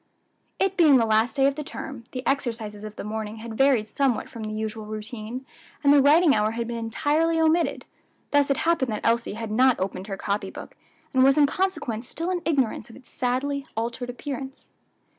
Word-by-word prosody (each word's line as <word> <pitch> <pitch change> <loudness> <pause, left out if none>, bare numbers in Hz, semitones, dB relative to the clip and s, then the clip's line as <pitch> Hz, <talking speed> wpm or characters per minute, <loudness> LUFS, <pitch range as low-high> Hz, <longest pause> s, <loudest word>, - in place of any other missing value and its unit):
It 385 0 0
being 305 -6 +7
the 230 - +3
last 220 +4 +2
day 270 -1 +3
of 275 - +3
the 300 +2 -5
term, 270 -4 -8
the 255 0 -6
exercises 230 -6 -2
of 215 0 -8
the - - -6
morning 215 0 -4
had 225 0 -8
varied 260 -4 +3
somewhat 260 -2 0
from 230 - -8
the 215 0 -4
usual 215 0 -4
routine, 215 +3 -6 0.4
and 285 0 +6
the 285 - +6
writing 300 +2 +6
hour 215 -1 +1
had 230 0 -3
been 235 0 -4
entirely 300 +8 +1
omitted; 320 +1 +2 0.5
thus 285 -1 +3
it 275 - +2
happened 325 -8 +2
that 210 - -5
Elsie 230 -1 +1
had 225 -1 -5
not 255 +3 +4
opened 190 +1 -3
her 195 -2 -4
copy 200 -1 -2
book, - - -10 0.4
and 260 -1 +5
was 270 +2 +5
in 295 - +6
consequence 290 - -2
still 335 +3 -2
in 360 -1 -1
ignorance 265 -9 0
of 230 - -13
its 260 - -16
sadly 270 +3 -1
altered 240 +2 -3
appearance. 265 +1 -7
250 Hz, 200 wpm, -25 LUFS, 220-285 Hz, 0.5 s, being